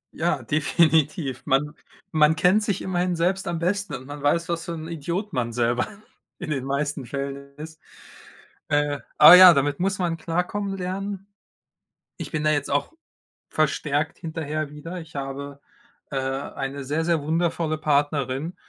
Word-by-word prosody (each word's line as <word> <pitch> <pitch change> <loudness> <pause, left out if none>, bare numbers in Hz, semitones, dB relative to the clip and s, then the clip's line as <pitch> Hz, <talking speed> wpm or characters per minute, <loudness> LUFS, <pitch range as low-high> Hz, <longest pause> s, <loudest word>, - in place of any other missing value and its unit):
Ja, 160 -5 -1
definitiv. 155 - +1
Man 150 +3 +1 0.4
man 155 0 +4
kennt 180 +6 +3
sich 205 -3 -2
immerhin 180 -1 -1
selbst 185 +3 0
am 170 -1 -1
besten 180 -1 -1
und 130 0 -9
man 145 0 -8
weiß, 165 +3 +1
was 170 -1 -3
für 170 - -4
'n 160 -1 -6
Idiot 170 +6 -4
man 120 -2 -1
selber 120 +1 +1 0.5
in 175 -4 -6
den 135 -3 -2
meisten 140 -1 -2
Fällen 140 +1 -6
ist. 155 +1 -10 0.9
Äh, 145 -1 +1 0.2
aber 150 +3 +11
ja, 180 -1 +10
damit 140 0 0
muss 190 +1 0
man 170 -2 -1
klarkommen 185 +4 -2
lernen. 195 +1 -4 0.9
Ich - - -7
bin 155 -1 -2
da 155 - +3
jetzt 145 -2 -1
auch 145 - 0 0.6
verstärkt 150 0 0
hinterher 155 -2 -4
wieder. 165 +5 -7
Ich 160 -2 -11
habe, 140 +1 -6 0.5
äh, - - -2
eine 135 +1 -4
sehr, 150 +4 -1
sehr 170 -2 +1
wundervolle 160 0 -1
Partnerin, 145 +1 0
155 Hz, 155 wpm, -24 LUFS, 140-170 Hz, 0.9 s, aber